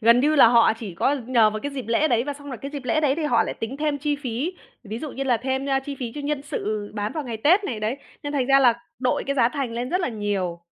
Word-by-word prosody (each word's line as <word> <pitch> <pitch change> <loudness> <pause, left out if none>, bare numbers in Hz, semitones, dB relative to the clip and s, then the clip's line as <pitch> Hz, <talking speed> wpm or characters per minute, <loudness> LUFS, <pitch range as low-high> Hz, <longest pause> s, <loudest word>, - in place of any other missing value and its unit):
gần 235 +2 +6
như 300 +3 +3
là 265 - +8
họ 230 -1 +5
chỉ 200 -6 -7
có 270 +11 +2
nhờ 235 -4 +4
vào 215 0 -4
cái 285 - -4
dịp 265 -3 -5
lễ 235 +7 +2
đấy 235 0 +2
và 290 - -3
xong 285 0 -11
rồi 260 - -5
cái 275 - -5
dịp 285 -3 -6
lễ 255 +5 +1
đấy 285 -3 +2
thì 325 - -2
họ 235 -6 +3
lại - - -4
tính 225 +4 -5
thêm 295 -1 -1
chi 295 +1 -1
phí, 275 +4 -3 0.3
ví 215 +2 -5
dụ 295 +2 -6
như 275 - -3
là 250 -3 +3
thêm, 265 +3 -2
ơ, 270 -1 +2
chi 285 - -5
phí 235 -3 -4
cho 295 - -5
nhân 290 -1 -1
sự 215 -8 -3
bán 210 0 -2
vào 310 -3 -4
ngày 235 -2 -4
Tết 345 - +4
này, 230 - -3
đấy, 220 +5 -1 0.3
nên 290 - -4
thành 265 -4 0
ra 275 0 +6
là 245 -3 +5 0.2
đội 250 -1 0
cái 280 +1 -1
giá 235 -3 +4
thành 270 -3 -3
lên 240 +2 -3
rất 365 - +1
là 350 - 0
nhiều. 200 -6 -2
260 Hz, 305 wpm, -24 LUFS, 230-285 Hz, 0.3 s, là